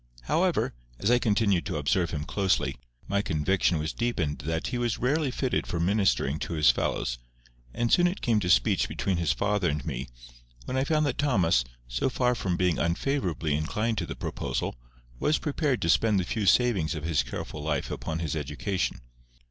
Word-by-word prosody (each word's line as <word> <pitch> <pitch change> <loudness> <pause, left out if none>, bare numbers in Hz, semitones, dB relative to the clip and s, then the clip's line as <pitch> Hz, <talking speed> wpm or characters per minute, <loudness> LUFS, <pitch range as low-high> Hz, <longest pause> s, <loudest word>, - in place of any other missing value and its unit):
However, - - +1 0.2
as 100 - +1
I 120 - +5
continued 100 -5 +2
to - - -2
observe 80 +4 +1
him 75 -2 -3
closely, 95 +7 0 0.3
my 100 +1 +1
conviction 90 +1 +1
was 80 +1 -2
deepened 90 -12 -1
that 80 +4 -2
he 125 - -2
was 120 -2 0
rarely 140 +4 +1
fitted 130 0 -1
for 85 - -2
ministering 90 -5 +1
to 85 - -4
his 75 -2 +5
fellows; - - -2 0.5
and 120 - 0
soon 175 0 +5
it 180 - -3
came 115 -4 +2
to 90 -3 -2
speech - - +3
between 95 -3 -1
his 85 -5 +1
father 100 +8 +1
and 75 +1 -3
me, 70 -4 -4 0.6
when 130 - -3
I 130 +1 +1
found 155 0 +2
that 145 - -2
Thomas, 95 - +3 0.2
so - - 0
far 125 -1 +1
from 95 -7 -1
being 90 -2 +1
unfavourably 85 - 0
inclined 105 +9 -1
to 85 - -3
the - - -5
proposal, - - -3 0.5
was 155 - +2
prepared 145 -6 -1
to 85 - 0
spend 105 +3 +4
the - - 0
few 105 +3 -2
savings 95 - +3
of 75 - -5
his 80 -2 +2
careful - - -6
life - - -2
upon 80 - -3
his 80 -2 -2
education. 75 +6 -2
95 Hz, 190 wpm, -27 LUFS, 80-120 Hz, 0.6 s, I